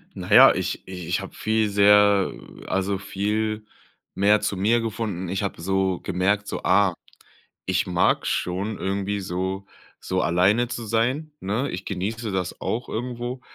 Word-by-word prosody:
Na - - -7
ja, - - +9
ich - - -4
i - - -9 0.2
ich 90 +4 0
habe 95 - -9
viel 110 0 0
sehr, 100 -1 +5
äh - - -13
also 95 +1 0
viel 105 +2 -2 0.5
mehr 105 +2 +3
zu 105 -1 -1
mir 110 +5 +3
gefunden. 110 -5 -3
Ich 95 +3 -2
habe 100 - -4
so 95 +1 0
gemerkt 100 +3 0
so: - - -4
„Ah, 95 -1 +3 0.7
ich - - 0
mag - - +1
schon 95 +4 -2
irgendwie 100 +1 -2
so 95 +1 -3 0.3
so 95 0 -1
alleine 95 +9 +3
zu 120 0 -5
sein, 125 +8 0
ne?" 115 +7 -2
Ich 95 +1 -6
genieße 105 +3 -3
das 95 -2 -3
auch 120 +3 -3
irgendwo 120 +2 -4
100 Hz, 160 wpm, -24 LUFS, 95-110 Hz, 0.7 s, ja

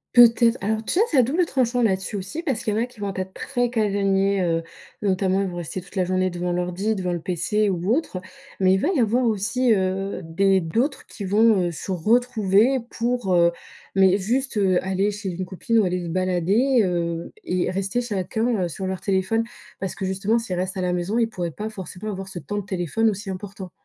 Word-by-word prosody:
Peut-être. 235 0 +6
Alors, 220 +2 -1
tu 285 - -2
vois, 440 +4 +4
c'est 300 - +2
à - - +9
double 320 +9 +1
tranchant, 250 -4 +1
là-dessus, 195 0 0
aussi 195 - -4
parce 275 -10 -2
qu'il 215 - 0
y - - -1
en - - +2
a 240 - 0
qui 250 -3 -19
vont 200 -1 -3
être 190 0 -4
très 245 -3 -1
casaniers, 200 -3 +1
heu. 165 -2 0 0.4
Notamment, 190 -1 +1
ils 195 - 0
vont 175 -1 -6
rester 175 +2 -5
toute 180 +3 -17
la 185 - +2
journée 185 0 0
devant 175 0 -2
l'ordi, 180 +5 -1
devant 180 -2 -2
le 175 - -2
PC 200 +5 0
ou 185 +3 0
autre. 295 - -2 0.4
Mais 185 -1 +4
il - - +4
va - - +1
y 340 - 0
avoir 240 +2 +2
aussi, 230 +3 +1
heu, 195 -1 0
des 190 +4 +2
d'autres 235 - -1
qui 200 - -8
vont, 205 -1 +4
heu, - - -2
se 170 +4 -6
retrouver, 220 +4 +3
pour 235 -5 0
heu, 170 0 +5 0.4
mais 190 0 +5
juste, 240 +5 -1
heu, 190 -3 +2
aller 190 +2 0
chez 205 -1 -5
une 185 +1 -4
copine 190 +5 -1
ou 220 - +5
aller 180 0 -1
se 170 - -5
balader, 185 +8 +2
heu, 170 -2 -2
et 185 - 0
rester 195 +6 -1
chacun, 220 0 -1
heu, - - 0
sur 185 +4 -5
leur 190 -1 -3
téléphone. 195 +3 +1 0.4
Parce 190 -2 -3
que 190 - -4
justement, 195 +5 +1
s'ils 225 -6 -4
restent 185 +2 -3
à - - -1
la 180 -1 0
maison, 180 +6 -1
ils 230 -1 +2
pourraient 175 -6 -4
pas 210 +7 -5
forcément 195 0 -7
avoir 190 -1 -6
ce 185 - -6
temps 205 +5 -5
de 205 - -3
téléphone 195 +4 0
aussi 200 0 -6
important. 190 -1 -7
195 Hz, 225 wpm, -23 LUFS, 185-225 Hz, 0.4 s, à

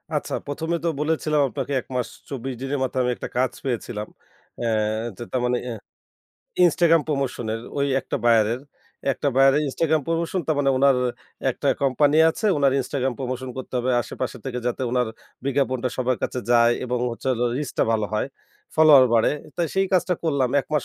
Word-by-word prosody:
আচ্ছা, - - -2
১ম 155 +3 -4
এ - - 0
তো - - +3
বলেছিলাম 150 -1 +1
আপনাকে 140 +5 -4
১ - - -26
মাস 125 - 0 0.2
২৪ 135 -1 -4
দিনের 135 +1 -2
মাথায় 130 0 0
আমি 125 - +1
একটা - - -6
কাজ 130 0 +2
পেয়েছিলাম। 115 -4 -3 0.5
অ্যা 120 - -1 0.5
তো - - -11
তার 130 - 0
মানে 125 0 +1
এ্যা 120 -2 -4 0.9
Instagram 165 -1 +4
প্রমোশন 135 -5 -2
এর 115 - -4 0.2
ওই 140 - +2
একটা - - -3
বায়ারের 115 +1 +3 0.5
একটা 145 - -1
বায়ারের 135 +2 +5
Instagram 160 +3 +1
প্রমোশন। 165 +2 -1
তার 155 - +2
মানে 135 -1 +3
উনার 140 -1 +5 0.5
একটা - - -2
কোম্পানি 140 +2 +3
আছে, 215 - -3
উনার 140 -2 +3
Instagram 130 0 -1
প্রমোশন 130 -1 -4
করতে 130 0 -7
হবে 125 +1 0
আশেপাশে 125 +2 -5
থেকে 125 -2 -3
যাতে 125 +2 -1
উনার 125 -1 +1 0.4
বিজ্ঞাপনটা 130 -2 0
সবার 130 -1 +1
কাছে 125 - -2
যায় 120 0 +5
এবং 125 0 -1
হচ্ছে 115 +3 -5
হলো 120 0 0
রিচটা 145 -3 -1
ভালো 110 -2 0
হয়। 105 - 0 0.5
ফলোয়ার 155 -4 +8
বাড়ে। 115 - +4 0.3
তাই 170 -1 +1
সেই 195 0 +2
কাজটা 180 0 +2
করলাম। 140 -6 +2
১ - - -14
মাস 145 -5 +1
130 Hz, 180 wpm, -23 LUFS, 125-150 Hz, 0.9 s, ফলোয়ার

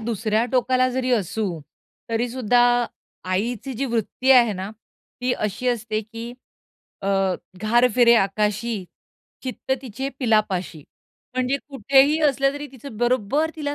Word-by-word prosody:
दुसऱ्या 220 0 0
टोकाला 255 0 +3
जरी 255 0 -1
असू 195 -4 -1 0.5
तरी 230 +2 0
सुद्धा 245 -1 +2 0.7
आईची 235 +7 -2
जी 270 - -2
वृत्ती 240 +2 -1
आहे 240 -4 +6
ना 190 +1 -5 0.5
ती 250 0 +1
अशी 215 +3 -2
असते, 225 -2 -1
की 230 +2 -8 0.7
अ, 195 -1 +1 0.3
घार 240 +3 +4
फिरे 240 -1 +6
आकाशी, 210 +1 0 0.6
चित्त 260 0 -3
तिचे 265 +2 -4
पिलापाशी. 205 - 0 0.5
म्हणजे 255 +2 +1
कुठेही 275 +3 +3
असले 275 0 +1
तरी 290 +1 -6
तिचं 260 -3 -10
बरोबर 255 +6 +1
तिला 290 -2 -3
235 Hz, 125 wpm, -23 LUFS, 215-255 Hz, 0.7 s, आहे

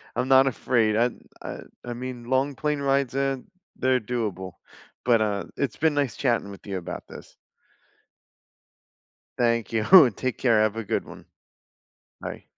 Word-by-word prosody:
I'm 130 - -1
not 135 0 +6
afraid. 115 -4 +1
I 115 - +4
n 125 - -4 0.2
I - - -6 0.2
I 120 - -5
mean, 125 0 -7
long 130 +3 0
plane 150 0 -1
rides 135 -2 +1
and 135 -1 -1 0.3
they're 130 0 +2
doable. 105 -6 -3 0.5
But, 120 -2 +4
uh, 105 -2 -1
it's 140 -4 -1
been 155 -2 +2
nice 140 -5 0
chatting 115 -6 0
with 100 - -13
you 95 - -3
about 90 - -6
this. - - -12 2.0
Thank 115 -3 +1
you. 110 -1 0
And, 140 - +9
take 130 -1 -2
care. 115 -4 +3
Have 110 0 0
a 115 - -4
good - - -1
one. - - -12 1.0
Bye. - - -7
120 Hz, 160 wpm, -25 LUFS, 110-135 Hz, 2.0 s, And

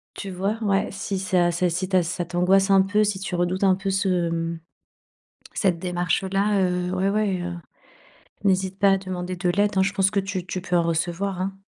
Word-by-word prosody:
Tu 195 - -6
vois? 195 +4 -2
Ouais, 200 -2 +1
si 195 0 -4
ça 180 -2 +2
c'est 175 +1 +1
si 180 +2 -2
ta 185 -2 +2
ça 175 +1 -3
t'angoisse 185 +3 +2
un 195 -1 +6
peu, 210 +2 +2
si 205 -2 -1
tu 195 -1 -5
redoutes 175 +2 0
un 190 -1 +5
peu 195 +1 -4
ce, 185 -3 +1
mmh, 165 0 -3 0.9
cette 185 -4 +1
démarche, 180 +1 -1
heu, - - -3
là, 200 +1 +2
heu, 180 0 0
ouais, 190 +2 +1
ouais, 200 -4 0
heu, 175 - -4 0.9
n'hésite 190 0 +1
pas 200 -1 +5
à 195 - +4
demander 185 -1 -5
de 180 0 -1
l'aide 205 +3 +2
hein, 190 - +5
je 200 - 0
pense 195 0 +3
que 200 -1 0
tu 190 -2 -4
tu 185 0 -4
peux 180 -1 0
en 170 - +2
recevoir 175 +3 -1
hein. 195 +1 -4
185 Hz, 220 wpm, -24 LUFS, 180-195 Hz, 0.9 s, un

